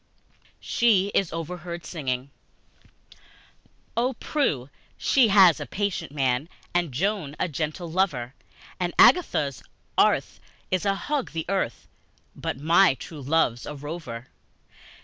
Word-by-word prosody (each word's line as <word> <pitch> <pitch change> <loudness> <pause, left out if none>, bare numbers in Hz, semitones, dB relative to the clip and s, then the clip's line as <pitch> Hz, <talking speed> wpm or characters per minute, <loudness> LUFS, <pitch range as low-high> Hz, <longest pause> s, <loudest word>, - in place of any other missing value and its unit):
She 205 -5 +2
is 195 - +1
Overheard 170 0 -6
Singing 135 -4 -3 1.6
OH, 250 +3 +1
PRUE 160 - -1 0.3
she 260 -4 +4
has 190 -6 +6
a - - -5
patient 200 -8 -2
man, 135 +1 0 0.2
And 175 -4 +1
Joan 170 - -1
a - - +1
gentle 160 +2 -3
lover, 160 -9 -1 0.5
And 175 -1 -2
Agatha's 145 - +4 0.4
Arth' - - +2 0.3
is 185 +1 0
a 195 - +2
hug 285 - -3
the 160 -1 -3
hearth, 190 -11 -2 0.5
But - - -4
my 165 +2 +4
true 150 +2 -9
love's 135 -4 +1
a 150 - -5
rover! 145 -5 -7
165 Hz, 120 wpm, -25 LUFS, 140-195 Hz, 1.6 s, has